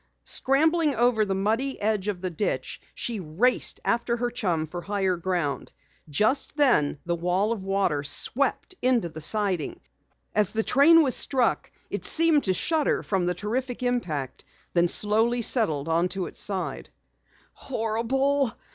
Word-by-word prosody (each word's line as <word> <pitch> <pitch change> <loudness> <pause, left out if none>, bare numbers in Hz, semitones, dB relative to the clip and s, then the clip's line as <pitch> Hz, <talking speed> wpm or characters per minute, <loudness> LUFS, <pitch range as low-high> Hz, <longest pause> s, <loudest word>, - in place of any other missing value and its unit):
Scrambling 310 +2 +2
over 235 -1 +2
the 195 -1 -2
muddy 225 +8 -1
edge 210 -2 -1
of 195 -4 -3
the 185 -1 -3
ditch, 175 +5 -3
she 230 -3 -3
raced 185 +10 +1
after 235 0 0
her 240 0 -2
chum 180 -10 -1
for 175 +3 -7
higher 195 -1 -1
ground. 175 -4 -3 0.4
Just 220 - +1
then 235 - +3
the 170 - -1
wall 180 +5 0
of 220 -5 -3
water 195 -7 0
swept 275 - 0
into 245 -8 +1
the 155 0 -9
siding. 190 -2 0 0.5
As 210 -1 +1
the 220 0 0
train 320 +7 +5
was 260 -4 +2
struck 260 -3 0 0.2
it - - -4
seemed 325 -3 +4
to 190 - +2
shudder 315 - 0
from 190 -3 -1
the 180 - 0
terrific 245 +6 -3
impact, 160 - -2 0.3
then 175 0 +3
slowly 225 +6 +1
settled 160 - +1
on 170 +2 +1
its 185 -2 -3
side. 195 -3 -2 0.6
"Horrible!" 260 +3 -1
210 Hz, 145 wpm, -25 LUFS, 180-250 Hz, 0.6 s, train